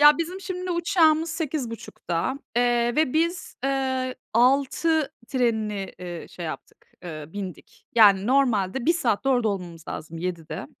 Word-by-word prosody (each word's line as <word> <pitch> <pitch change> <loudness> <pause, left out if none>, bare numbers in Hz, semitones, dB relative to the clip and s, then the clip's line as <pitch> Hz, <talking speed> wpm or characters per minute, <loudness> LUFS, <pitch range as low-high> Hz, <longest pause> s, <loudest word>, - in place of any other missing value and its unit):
Ya, 295 +1 +8
bizim 355 +3 -3
şimdi 365 -1 -4
uçağımız 335 -2 +3
8.30'da, 265 - -3 0.2
eee, 240 0 +2
ve 310 -5 +3
biz, 335 +2 0
eee, 260 -1 0 0.2
06.00 275 +6 +3 0.2
trenini, 220 -6 0
iii, 175 -2 -7
şey 175 - -8
yaptık, 155 - -8 0.2
eee, 155 -4 -6
bindik. 190 -3 -8
Yani, 205 -3 +6
normalde 250 -3 +2
1 335 - +6
saatte 265 -6 0
orada 245 -4 +3
olmamız 175 -5 -5
lazım, 160 +1 -6
07.00'de. 170 -6 -4
250 Hz, 135 wpm, -25 LUFS, 195-310 Hz, 0.2 s, Ya